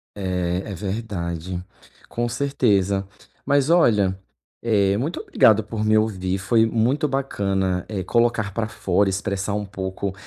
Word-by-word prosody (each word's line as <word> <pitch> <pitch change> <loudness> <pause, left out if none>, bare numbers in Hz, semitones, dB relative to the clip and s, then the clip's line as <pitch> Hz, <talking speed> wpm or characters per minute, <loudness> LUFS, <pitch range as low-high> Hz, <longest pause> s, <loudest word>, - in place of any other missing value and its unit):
É, 90 -1 -2
é - - -4
verdade, 90 -3 -4 0.5
com 120 0 -2
certeza. 105 -7 +1 0.4
Mas 140 +1 +2
olha, 105 - +3 0.4
eh, 100 -4 +2
muito 145 +10 -2
obrigado 110 0 +4
por 110 +1 -4
me 110 0 +4
ouvir. 95 -4 0
Foi 110 +4 +3
muito 120 +7 +1
bacana, 100 -9 -1
é 100 -3 -3
colocar 115 0 +1
para 110 +2 -1
fora, 100 -2 +1
expressar 100 +1 -2
um 105 0 -2
pouco 95 0 -4
100 Hz, 135 wpm, -23 LUFS, 95-115 Hz, 0.5 s, obrigado